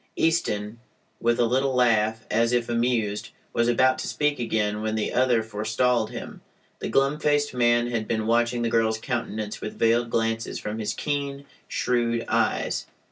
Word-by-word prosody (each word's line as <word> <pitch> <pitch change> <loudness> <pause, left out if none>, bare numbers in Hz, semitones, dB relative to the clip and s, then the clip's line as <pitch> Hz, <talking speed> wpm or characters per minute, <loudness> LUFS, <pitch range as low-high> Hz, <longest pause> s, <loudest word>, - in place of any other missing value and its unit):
Easton, 115 -10 0 0.4
with 120 0 +1
a 120 - +4
little 130 +3 +1
laugh, 110 -3 +2
as 115 +2 +2
if 120 -1 +1
amused, 115 -3 0 0.2
was 115 0 +2
about 130 +2 +3
to - - -3
speak 150 -2 0
again 105 -3 -1
when 110 0 -1
the 110 - -1
other 125 -3 +3
forestalled 110 +2 0
him. - - -8 0.4
The - - -4
glum 135 +2 +2
faced 145 -1 +1
man 120 -1 +3
had 115 -2 -2
been 110 -1 -1
watching 120 +1 +1
the 115 - +1
girl's 110 -1 +2
countenance 110 -3 -4
with 110 - -6
veiled 115 +1 +2
glances 115 0 -1
from 105 +1 -5
his 110 - -2
keen, 140 -1 -3 0.2
shrewd 120 -2 0
eyes. - - 0
115 Hz, 165 wpm, -25 LUFS, 110-125 Hz, 0.4 s, a